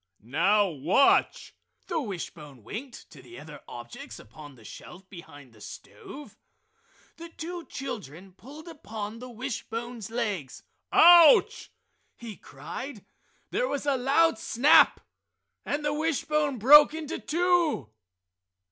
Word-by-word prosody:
"Now 190 - +2
watch!" 170 - +1 0.3
the 340 -4 -3
wishbone 155 - -9
winked 245 - -10
to - - -14
the 355 - -13 0.3
objects 120 0 -10
upon 145 +6 -14
the 115 - -19
shelf 180 - -13
behind 145 - -14
the 110 - -20
stove. 295 - -12 0.8
The 335 0 -10
two 335 +1 -8
children 190 - -8
pulled 285 - -14
upon 225 -9 -8
the 250 +1 -10
wishbone's 235 -2 -7
legs. 205 - -5 0.3
"Ouch!" 340 -3 +6 0.5
he 230 -3 -10
cried. 255 +1 -10 0.5
There - - -1
was 285 - -4
a 285 -2 +1
loud 270 +1 +1
snap, 275 +7 +4 0.7
and 295 +1 -3
the 295 - 0
wishbone 300 -2 -1
broke 295 +7 +7
in 320 -1 -6
two. 330 - -1
245 Hz, 115 wpm, -26 LUFS, 185-300 Hz, 0.8 s, broke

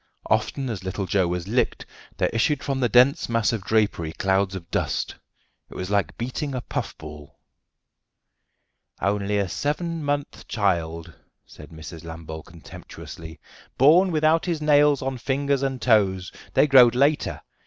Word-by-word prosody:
Often 135 -1 0
as 95 -4 -6
little 95 +1 -3
Joe 95 -1 +1
was 90 0 -3
"licked" 120 +5 0 0.3
there - - +1
issued 140 +5 +1
from 135 -2 -2
the 125 -2 +1
dense 125 +7 +4
mass 115 -1 +1
of 110 - -2
drapery 100 -7 0
clouds 95 +1 0
of 85 -3 -9
dust. - - -1 0.6
It - - -13
was 90 +2 -5
like 100 -1 0
beating 130 +4 -4
a 125 - -3
puff - - -5
ball. 75 -2 -11 1.6
"Only 100 +1 0
a 100 -1 0
seven 160 - -3
month 145 0 -3
child," 85 -5 -1 0.3
said 75 -1 -14
Mrs. 80 +1 -10
Lambole 80 -1 -8
contemptuously, 80 -1 -11 0.4
"born 170 +8 +5
without 155 +1 +2
his 170 -3 -1
nails 145 -2 +4
on 130 -1 -3
fingers 140 +2 0
and 135 -1 -2
toes; 95 -7 +2 0.2
they - - +5
growed 125 -4 +6
later. 140 +4 +1
110 Hz, 150 wpm, -24 LUFS, 90-140 Hz, 1.6 s, growed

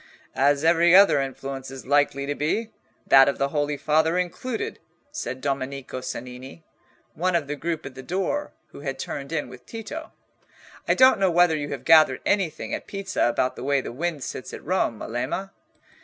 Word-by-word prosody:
"As 140 +2 +2
every 170 +1 +5
other 195 -7 +7
influence 135 0 -5
is 135 -1 -9
likely 140 0 +2
to 145 - -1
be, 210 +11 -1 0.3
that 135 0 +7
of 140 - -2
the 140 0 0
Holy 145 0 -1
Father 160 +4 +2
included," 200 +7 -3 0.3
said 130 - -5
Domenico 135 -1 -3
Cennini, 125 +4 -8 0.5
one 180 +3 0
of 165 -4 +1
the 145 +1 -4
group 160 +1 -3
at 135 - -7
the 130 - -9
door, 195 - -2 0.2
who - - -11
had 135 -2 -4
turned 140 +2 -6
in 155 -5 -2
with 125 0 -13
Tito. 235 +8 -7 0.8
"I - - +3
don't 260 -5 +6
know 190 -1 +3
whether 175 -1 +4
you 145 -1 -3
have 130 -2 -6
gathered 155 -5 +6
anything 175 -6 0
at - - -4
Pisa 195 -1 -1
about 125 +2 0
the - - -8
way 140 +1 +2
the 130 - -5
wind 155 +2 -3
sits 130 - -6
at - - -12
Rome, 170 -9 0
Melema?" 150 - -4
145 Hz, 185 wpm, -24 LUFS, 135-175 Hz, 0.8 s, other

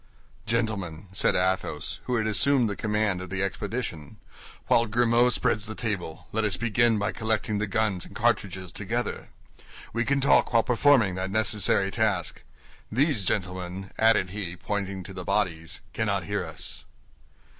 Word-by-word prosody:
"Gentlemen," 100 -7 -2
said 95 - +1
Athos, 95 0 -1
who 125 - 0
had 110 -2 +1
assumed 125 +4 +3
the 100 - -3
command 105 -3 0
of 95 - -7
the 95 +1 -1
expedition, 100 - -4 0.5
"while 115 0 +3
Grimaud 120 +2 +3
spreads 110 -4 0
the 110 - -6
table, 100 -8 -4
let 110 +1 0
us 100 -4 0
begin 120 0 +2
by 105 +1 0
collecting 110 -2 -1
the 105 - -1
guns 100 -3 0
and - - -15
cartridges 95 -6 0
together. - - -3 0.6
We 120 +2 +1
can 140 +2 +1
talk 135 -2 +4
while 115 -1 +5
performing 125 -5 +4
that 95 - -2
necessary 105 -2 +2
task. 95 -6 0 0.5
These 125 - +1
gentlemen," 95 0 -3
added 110 -5 +4
he, 95 -4 -4
pointing 100 0 -3
to 95 - -9
the 90 -1 -6
bodies, 85 -5 -1
"cannot - - 0
hear - - -2
us." - - -7
105 Hz, 155 wpm, -27 LUFS, 95-115 Hz, 0.6 s, while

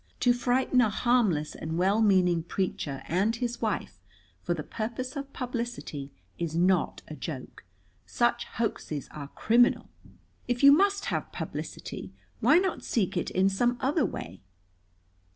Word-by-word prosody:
To 245 - +5
frighten 250 +1 +2
a 225 - +3
harmless 215 -9 +1
and 160 +1 -4
well 195 +5 +3
meaning 180 -5 +4
preacher 160 -5 -3
and 200 +7 +1
his 240 0 -3
wife 215 - -2 0.4
for 175 - -1
the 155 - -5
purpose 235 - -4
of 275 -1 -5
publicity 240 - -5 0.3
is 165 -2 -2
not 180 +1 +2
a 155 - -7
joke. 135 -2 -7 0.4
Such 240 0 +1
hoaxes 155 - -3
are 145 -2 -7
criminal. 240 - +2 0.6
If 245 +2 -1
you 280 - +10
must 400 +6 +3
have - - -2
publicity, - - -6 0.3
why 260 +8 +5
not 375 0 0
seek 200 -6 0
it 175 - -1
in 190 +1 +2
some 240 +5 +1
other 275 +3 +1
way?" 90 - -5
220 Hz, 145 wpm, -28 LUFS, 170-245 Hz, 0.6 s, you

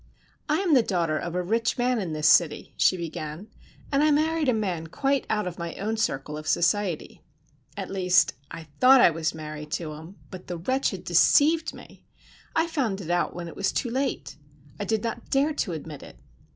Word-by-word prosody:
"I 305 +5 +2
am 360 -5 +2
the 260 - +6
daughter 170 -7 0
of 175 0 -5
a 180 - 0
rich 225 +5 0
man 245 -1 +1
in 180 -4 -4
this 155 -1 +1
city," 155 -2 +3
she 185 - +3
began, 165 +3 -6 0.4
"and 275 0 +2
I 305 - +4
married 310 0 +2
a - - +5
man 185 -7 -2
quite 275 - -1
out 210 -2 0
of 180 0 -6
my 170 0 -5
own 215 +3 -2
circle 150 -8 -2
of 155 - -10
society. 180 -1 0 0.6
At - - -5
least, 180 -6 +3 0.2
I 165 -1 -8 0.2
thought 260 +1 +7
I 205 - +6
was 160 0 -2
married 150 -1 -7
to 155 -3 -3
him, 160 +5 -11 0.2
but 185 -2 -10
the 175 - -4
wretch 260 +11 0
had - - -7
deceived 320 +2 +3
me! - - -15 0.5
I 325 - +3
found 260 - -2
it 175 -3 -5
out 175 0 0
when 175 -1 -6
it 165 - -9
was 195 - 0
too 240 - -2
late. 260 - -3 0.4
I 205 - -2
did 220 +1 -1
not 230 0 -5
dare 285 +3 +2
to 205 - -2
admit 155 -2 -7
it. - - -13
190 Hz, 205 wpm, -26 LUFS, 165-255 Hz, 0.6 s, thought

